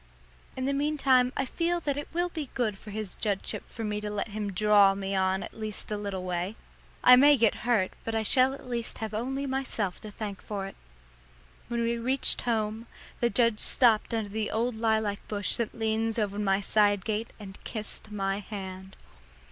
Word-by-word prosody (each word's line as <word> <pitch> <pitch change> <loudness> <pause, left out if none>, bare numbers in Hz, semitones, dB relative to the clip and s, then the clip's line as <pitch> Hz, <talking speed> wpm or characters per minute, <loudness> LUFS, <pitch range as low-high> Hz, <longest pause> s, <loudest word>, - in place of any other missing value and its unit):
In 260 - -2
the 280 - +1
meantime 275 -3 +3
I 275 - +1
feel 345 +5 0
that 285 -3 -1
it 290 - -4
will 350 +1 0
be 310 -6 -5
good 225 -5 0
for 210 - -12
his 210 -2 -5
judgeship 205 -3 -2
for 230 - -6
me 210 -1 -2
to 210 - -3
let 210 +1 -3
him 210 -1 -3
"draw" 200 0 +5
me 195 0 -3
at 190 0 0
least 215 -1 -4
a - - 0
little 200 -3 -4
way. 180 +3 -2 0.5
I 250 - +10
may 285 +3 +7
get 230 0 +1
hurt, 210 -6 +3
but 225 - -3
I 220 - +1
shall 260 +4 +4
at 275 - -13
least 235 -2 -4
have 220 -1 -5
only 265 +6 -2
myself 260 -8 -2
to 215 - -8
thank 205 -2 -6
for 200 -2 -4
it. 195 - -8 0.9
When 235 0 -1
we 235 0 0
reached 260 +3 +2
home, 225 -1 -1 0.3
the 240 - +2
judge 230 -3 +3
stopped 230 -4 +3
under 220 -3 -1
the 215 0 -1
old 235 +3 0
lilac 220 -2 0
bush 205 -1 0
that 235 -2 -2
leans 225 0 0
over 205 -2 -1
my 195 -1 +2
side 205 -2 +2
gate 220 +1 -2
and 195 -2 -11
kissed 215 -1 -3
my 195 -1 -1
hand. 190 -2 -8
220 Hz, 195 wpm, -28 LUFS, 205-240 Hz, 0.9 s, I